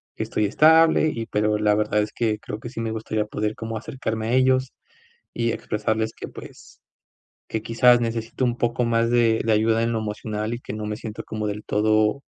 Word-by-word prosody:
que - - -3
estoy 105 - -1
estable, 160 +8 +5
y 115 -1 -4
pero 105 -1 +1
la 105 0 +2
verdad 105 0 +1
es 105 0 -3
que 110 -3 0
creo 105 - -7
que 120 - -7
sí 115 -2 -6
me 115 - -2
gustaría 110 -1 -2
poder 105 0 -3
como 115 0 -5
acercarme 110 -1 -4
a 115 - 0
ellos, 130 0 +2 0.6
y 115 0 0
expresarles 110 +1 -2
que, - - -8
pues, - - -13 0.7
que, 110 - -3
quizás, 120 +2 +4
necesito 115 +2 -2
un 120 -1 -1
poco 120 0 0
más 115 0 +1
de 115 -2 +3
de 115 - +2
ayuda 110 +1 +2
en 115 - 0
lo 115 - -1
emocional, 110 +1 -3
y - - -8
que 115 - -8
no 105 0 -4
me 105 - -3
siento 110 -1 -7
como 110 -1 -4
del 105 +1 -4
todo 110 +4 +2
110 Hz, 210 wpm, -23 LUFS, 105-120 Hz, 0.7 s, estable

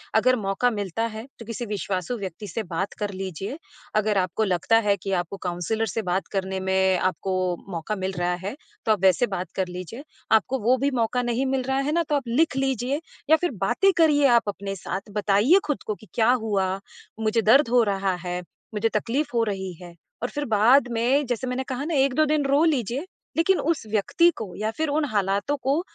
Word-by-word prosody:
अगर 255 +3 +4
मौक़ा 195 +5 +1
मिलता 205 0 -2
है 220 - -7
तो 230 - -9
किसी 230 +1 -5
विश्वासू 205 +1 -3
व्यक्ति 195 0 -6
से 220 +5 -3
बात 185 +3 -2
कर 205 -1 -2
लीजिए। 190 - -5 0.4
अगर 215 -1 +2
आपको 185 +3 0
लगता 195 +3 +2
है 200 - +4
कि 195 - -3
आपको 180 +1 -2
काउंसलर 200 +6 -1
से 225 - +1
बात 190 +2 0
करने 190 0 -1
में 190 0 +2
आपको 185 +1 -1 0.4
मौक़ा 170 +5 -3
मिल 190 0 -2
रहा 175 0 +1
है, 205 - -3 0.3
तो 220 - +3
आप 210 - +2
वैसे 190 +5 +4
बात 180 +1 -5
कर 190 -1 0
लीजिए। 180 - -7 0.3
आपको 220 +4 +3
वो 245 +4 +3
भी 280 +2 0
मौक़ा 245 +2 +1
नहीं 240 +2 0
मिल 265 -1 0
रहा 265 +1 -1
है - - +1
ना 340 +2 +2
तो 295 - +2
आप 275 -4 -2
लिख 255 +3 +2
लीजिए 270 +1 0 0.3
या 315 - +8
फिर 355 - 0
बातें 390 - +3
करिए 300 -3 +5
आप 235 -4 +3
अपने 195 0 -4
साथ, 190 0 -4
बताइए 210 - +4
खुद 295 -2 -2
को 215 - -1
कि 215 - -17
क्या 225 +1 +4
हुआ, 205 -6 0 0.5
मुझे 220 +1 +1
दर्द 235 +4 +5
हो 245 0 +5
रहा 195 -2 0
है, 180 0 -2 0.3
मुझे 215 +2 +1
तकलीफ़ 245 +8 0
हो 230 - +3
रही 190 -3 -3
है। 175 -1 -10 0.3
और 245 - 0
फिर 290 0 -3
बाद 235 +4 +5
में 250 +5 +2
जैसे 245 +1 -2
मैंने 250 +1 -2
कहा 265 +2 -3
ना 335 - -2
1-2 275 +3 +3
दिन 300 -1 +1
रो 280 +3 +3
लीजिए 270 - 0 0.3
लेकिन 370 +3 +3
उस 320 -5 0
व्यक्ति 220 - +3
को 210 -6 -6
या 215 +1 -1
फिर 315 -1 0
उन 300 +1 +1
हालातों 200 +6 0
को 275 +4 +2
220 Hz, 210 wpm, -25 LUFS, 195-265 Hz, 0.5 s, या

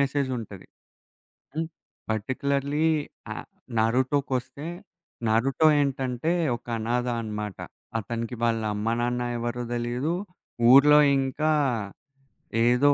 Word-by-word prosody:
మెసేజుంటది. 130 -8 -2 0.9
హ్మ్. 160 0 -1 0.4
పర్టిక్యులర్‌లి 140 +7 0 0.5
య - - -1 0.5
నారుటోకొస్తే, 130 +4 0 0.6
నారుటో 135 +8 +3
ఏంటంటే, 135 +2 -1 0.3
ఒక - - -30
అనాధ 120 +2 0
అనమాట. 105 -3 -5 0.4
అతనికి 115 +3 -4
వాళ్ళ 115 -1 +2
అమ్మనాన్న 120 +3 0 0.2
ఎవరో 120 +1 -3
దెలీదు. 120 +6 -1 0.6
ఊరి‌లో 150 +2 +8 0.2
ఇంకా 135 +4 0 1.2
ఏదో, 140 +4 +5
125 Hz, 85 wpm, -26 LUFS, 115-140 Hz, 1.2 s, ఊరి‌లో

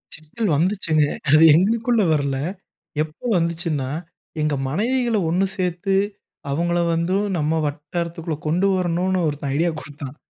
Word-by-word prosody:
சிக்கல் 175 +7 -4
வந்துச்சுங்க. 165 -4 +2 0.3
அது 155 +1 +7
எங்களுக்குள்ள 225 +5 +2
வரல. 140 -2 0 0.7
எப்போ 155 +8 -12
வந்துச்சுன்னா, 165 -5 -1 0.5
எங்க 150 -1 +1
மனைவிகள 235 - +1
ஒன்னு 185 +3 +2
சேத்து 185 +1 -1 0.6
அவுங்கள 170 +3 0
வந்து 170 +3 0 0.2
நம்ம 155 +1 +1
வட்டாரத்துக்குள்ள 165 +2 -4
கொண்டு 180 +6 +2
வரணுன்னு 185 +1 0
ஒருத்தன் 145 -2 -3
ஐடியா 170 +3 +2
கொடுத்தான் 145 -1 -9
170 Hz, 115 wpm, -22 LUFS, 150-185 Hz, 0.7 s, அது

